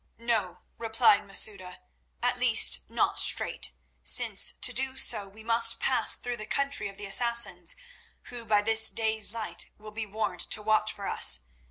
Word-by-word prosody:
"No," 225 -5 -4 0.2
replied 225 -2 +1
Masouda; 195 -2 0 0.5
"at - - -1
least - - +4
not - - -1
straight, - - +2 0.3
since - - +2
to 250 - -1
do 265 +2 -3
so 200 - +1
we 210 +3 -17
must 230 0 +3
pass 260 - +2
through 245 -1 -7
the 215 -1 -10
country 280 -2 -1
of 195 -1 -13
the 205 - -6
Assassins, 235 - +2 0.5
who 245 -1 -7
by 210 -2 0
this 220 0 +5
day's 220 -2 -1
light 225 -2 -4
will 215 0 -13
be 220 0 -7
warned 200 -4 -5
to 210 - 0
watch 215 0 +1
for 200 - -8
us. 65 -1 +3
220 Hz, 165 wpm, -26 LUFS, 205-235 Hz, 0.5 s, this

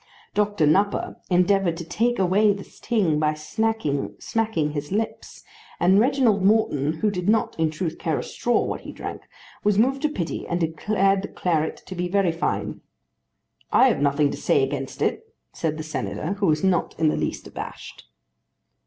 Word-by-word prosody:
Doctor 205 -5 +1
Nupper 195 +7 +1
endeavoured 180 -1 +3
to 170 - -5
take 240 +7 0
away 195 +3 +3
the 200 0 -7
sting 185 -11 0
by 155 0 +1
smacking 155 -2 -2 0.5
his 145 +1 -5
lips, 220 +3 -3 0.4
and 190 +3 +5
Reginald 235 -5 +3
Morton, 175 -9 +2
who 215 - +2
did 180 0 -2
not 220 0 +2
in 160 -1 +3
truth 160 +1 -4
care 160 -3 0
a - - -3
straw 240 - 0
what - - -4
he - - -8
drank, - - -7 0.4
was 205 -1 +2
moved 265 +5 +2
to 305 - +2
pity 175 - -4
and 175 - -1
declared 195 +4 +1
the 200 - -5
claret 160 -3 -1
to - - -7
be 180 0 -2
very 190 -1 +2
fine. 165 +1 -2 0.9
"I 265 - +6
have 215 - 0
nothing 145 0 +2
to - - -5
say - - +2
against 135 0 -3
it," 450 +1 -2 0.2
said 155 -2 -2
the 155 - -4
Senator, 155 +2 -3
who 200 - +2
was 155 -1 +2
not 185 -3 +1
in 160 -1 +4
the - - 0
least - - -3
abashed. - - -9
185 Hz, 175 wpm, -24 LUFS, 155-210 Hz, 0.9 s, I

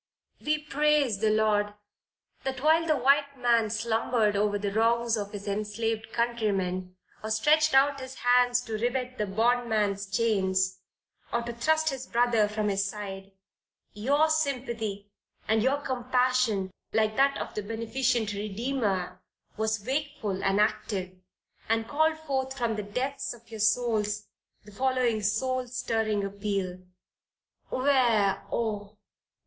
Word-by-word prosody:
We 305 0 +2
praise 295 -6 +1
the 215 0 +2
Lord, 210 -1 +2 0.7
that 265 -1 -3
while 325 +2 +4
the 310 -2 +3
white 280 +2 +2
man 235 -3 +2
slumbered 225 0 +1
over 205 0 +1
the 200 0 -2
wrongs 230 +1 +2
of 205 -2 -4
his 205 0 -7
enslaved 215 +2 -2
countrymen, 195 -6 -1 0.3
or 220 - -4
stretched 300 +7 +3
out 275 +1 +4
his 260 0 -8
hands 245 0 +3
to 220 -3 -5
rivet 250 +2 -2
the 210 - 0
bondman's 215 -2 +1
chains, 190 -3 +1 0.5
or 235 - 0
to 235 0 -5
thrust 315 +6 +1
his 260 -1 -6
brother 235 -3 +3
from 210 0 -1
his 195 0 +1
side, 195 -1 -6 0.6
your 280 +9 +2
sympathy 235 -9 -2 0.4
and 220 +1 +3
your 265 +4 +2
compassion, 250 -6 +1 0.2
like 215 -1 +2
that 275 +2 +3
of - - -5
the 210 - -3
beneficent 230 +1 -1
Redeemer, 205 -3 -2 0.3
was 220 -1 -1
wakeful 265 -8 -2
and 195 +1 +2
active, 200 -3 0 0.6
and 225 0 +1
called 315 +3 +2
forth 270 -4 -3
from 235 -3 0
the 210 - -2
depths 250 +6 -3
of 235 0 -20
your 220 - -7
souls 210 -1 +1 0.3
the 210 - -14
following 250 -1 +1
soul 250 +5 0
stirring 225 -4 -1
appeal. 195 -2 -3 0.9
Where, 240 -8 +2
oh! 210 -2 -3
225 Hz, 135 wpm, -28 LUFS, 205-255 Hz, 0.9 s, while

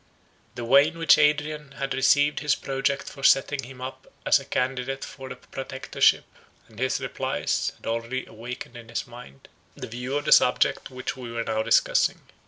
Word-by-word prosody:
The 120 - -5
way 140 +5 +6
in 165 +1 -7
which 165 -2 +5
Adrian 150 -1 +1
had 135 0 -3
received 145 +2 +3
his 150 -1 +1
project 135 0 -2
for 140 - -9
setting 135 +1 +3
him 125 0 -12
up 130 +1 -8
as - - +5
a - - -11
candidate 130 +1 -2
for 135 -2 -10
the - - -6
Protectorship, 135 0 0 0.4
and 110 0 -16
his 130 +1 0
replies, - - -2
had - - -18
already 115 +3 -3
awakened 120 +2 -8
in 115 -1 -12
his 120 - -3
mind, 120 - -13 0.3
the - - -7
view 125 +4 -4
of 145 - -4
the - - 0
subject - - +4
which 130 0 -5
we 125 -2 -8
were 115 0 -2
now 110 -1 -1
discussing. - - +2
130 Hz, 185 wpm, -25 LUFS, 120-140 Hz, 0.4 s, way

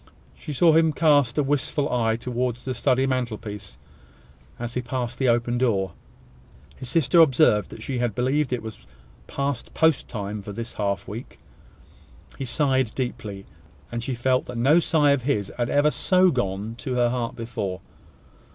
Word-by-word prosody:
She - - -8
saw 160 +3 +4
him 160 -1 +4
cast 145 -6 +3
a 150 - +3
wistful 145 +1 0
eye 115 -2 +2
towards 120 0 -3
the 130 - -2
study 130 +1 +2
mantelpiece, 110 -6 -4 0.8
as 120 0 -5
he 125 - -1
passed 125 -1 -4
the 130 -2 +2
open 120 +1 +1
door. 100 -7 +1 0.8
His 130 -3 -8
sister 165 +1 +3
observed 130 - +4
that 110 - -10
she 130 -1 -3
believed 130 +5 0
it 125 -2 -2
was 110 -1 -9 0.4
past 140 -3 -3
post 160 -3 +3
time 105 -1 -5
for 105 +1 -8
this 115 +2 -6
half 100 -3 -2
week. 110 +5 -8 1.0
He 135 - -3
sighed 130 -2 +1
deeply; 105 -6 -4 0.5
and 120 - -3
she 125 +2 -3
felt 130 +2 +1
that 125 - -6
no 140 +8 +5
sigh 150 -4 +3
of 140 -2 +2
his 120 -7 -1
had 120 -1 -1
ever 145 +1 +3
so 185 +1 +3
gone 105 - -2
to 130 -3 -3
her 120 -1 +3
heart 120 -2 -3
before. 100 -6 -4
125 Hz, 165 wpm, -24 LUFS, 115-140 Hz, 1.0 s, no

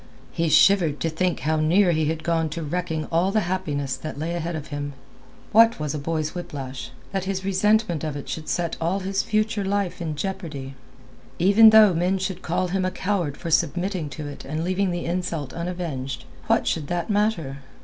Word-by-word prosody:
He 165 -1 0
shivered 170 -4 +5
to 165 - 0
think 175 +1 0
how 155 +1 +1
near 175 +5 +4
he 160 -1 +1
had 160 +1 -2
gone 165 -1 +1
to 165 +2 -4
wrecking 160 0 -2
all 170 +3 +2
the 215 +1 +2
happiness 150 -8 -2
that 155 +1 -7
lay 160 +3 -2
ahead 170 0 -3
of 155 -1 -6
him. 145 -1 -4 0.6
What 230 -1 +6
was 150 -1 -2
a 150 - -3
boy's 155 +1 -2
whiplash, 135 -7 -6 0.2
that 195 -1 -2
his 190 -1 -3
resentment 195 -3 +2
of 155 -2 -3
it; 140 - -8
should 155 -1 -5
set 170 -2 -1
all 180 +4 0
his 195 +1 0
future 215 -1 0
life 195 -2 -1
in 160 -3 -3
jeopardy? 150 -7 -5 0.6
Even 205 +5 +7
though 215 -3 +7
men 180 +3 +1
should 185 -1 -3
call 175 +2 -1
him 190 +1 0
a 185 - +1
coward 185 -6 -2
for 170 - -5
submitting 175 +1 0
to 150 +1 -7
it 145 - -8
and 155 +3 -3
leaving 185 +2 0
the 175 -1 -3
insult 170 -5 -3
unavenged, 170 -7 -4 0.2
what - - +3
should 150 -3 -1
that 175 +4 -2
matter? 200 -10 0
170 Hz, 195 wpm, -24 LUFS, 155-190 Hz, 0.6 s, Even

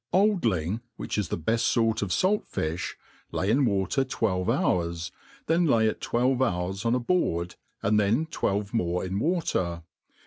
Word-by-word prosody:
OLD 200 - +3
ling, 95 +1 0
which - - -4
is 105 -5 -1
the - - -1
beft 110 +8 +1
fort 115 -1 +2
of 100 -3 -2
falt 195 - +1
filh, 80 +3 -3 0.4
lay 95 +3 0
in 135 +4 +3
water 100 +5 +1
\fRt\vz 100 -8 -1
hours, 85 -1 0 0.3
then 165 +1 +2
lay 115 -5 +4
it 110 - -1
twelve 125 +2 +1
dours 95 -5 -1
on 115 +1 +3
a - - +1
boardi, 105 - 0 0.3
and 105 +1 +3
then 110 +10 +2
fwelve 100 -9 -2
more 90 -5 0
'in 95 +2 -2
water. 95 - -1
105 Hz, 170 wpm, -27 LUFS, 90-130 Hz, 0.4 s, lay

